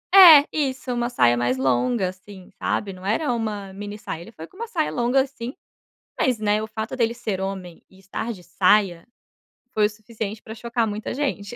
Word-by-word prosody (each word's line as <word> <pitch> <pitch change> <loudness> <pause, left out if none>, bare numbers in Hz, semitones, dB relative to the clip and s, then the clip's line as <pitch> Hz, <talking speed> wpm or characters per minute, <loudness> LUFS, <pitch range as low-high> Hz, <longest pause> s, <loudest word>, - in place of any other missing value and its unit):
É 320 -7 +11
isso, 265 -4 -1
uma 240 0 -1
saia 120 - +4
mais 120 +1 0
longa, 135 - +1
assim, 185 0 -13
sabe, 200 -2 -1
não 185 0 -13
era 245 +7 0
uma 210 -4 -4
mini 205 +1 -7
saia. 165 -5 -6
Ele 180 - -11
foi 160 -6 -10
com - - -22
uma 465 +4 -5
saia 335 -8 -1
longa, 245 +3 +2
assim, 260 -2 -6 0.6
mas, 255 -6 +2
né, 210 0 +1
o - - -3
fato 220 +1 -5
dele 235 -2 +1
ser 215 -6 -3
homem 190 -3 -5
e 190 - -20
estar 195 +5 -4
de 180 - -14
saia 185 -1 +2 0.7
foi 215 -1 +4
o 210 - -2
suficiente 215 0 -6
pra 220 - -9
chocar 235 0 -1
muita 210 0 -4
gente. 250 -6 -2
215 Hz, 195 wpm, -23 LUFS, 190-240 Hz, 0.7 s, É